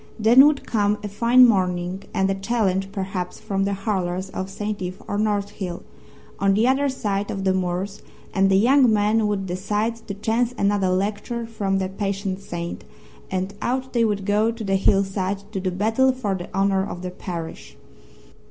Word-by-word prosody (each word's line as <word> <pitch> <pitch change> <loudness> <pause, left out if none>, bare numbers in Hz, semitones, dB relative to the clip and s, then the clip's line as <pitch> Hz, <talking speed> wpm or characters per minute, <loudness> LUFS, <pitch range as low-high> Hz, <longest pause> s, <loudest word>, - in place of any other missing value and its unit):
Then 240 +6 +7
would 300 -2 0
come 210 -2 +1
a - - -2
fine 235 +5 +5
morning, 185 -3 0
and 190 - +1
a 195 - +1
challenge 195 -2 0
perhaps 190 -3 -4
from 195 -2 -1
the 200 0 0
Hurlers 190 -2 -2
of 190 +1 -4
St. 205 +1 -4
Ive 185 0 -5
or 205 - -2
North 205 -1 0
Hill, 185 -4 -6 0.6
on 195 0 +3
the 220 +4 +3
other 275 +2 +2
side 205 -6 -2
of 195 -1 -3
the 190 -1 +2
moors, 185 +2 -2 0.3
and 195 0 +3
the 195 - +4
young 250 +3 +5
men 210 +1 +2
would 200 -2 -1
decide 205 +5 -1
to 200 - -4
chance 225 +4 0
another 200 -1 +2
lecture 205 +5 -1
from 200 -4 -1
the 190 -1 -1
patient 195 0 -3
saint, 170 -2 -5 0.5
and 190 +1 -2
out 260 +1 -2
they 235 -2 +3
would 205 -3 0
go 210 +2 +2
to 230 -1 -5
the 195 -1 +1
hillside 195 0 +1
to 195 - -3
do 185 0 -1
battle 225 +8 +2
for 250 -6 -2
the 180 -2 -5
honour 195 0 +2
of 185 -2 -6
their 180 - -4
parish. 170 -3 -7
200 Hz, 185 wpm, -23 LUFS, 190-220 Hz, 0.6 s, Then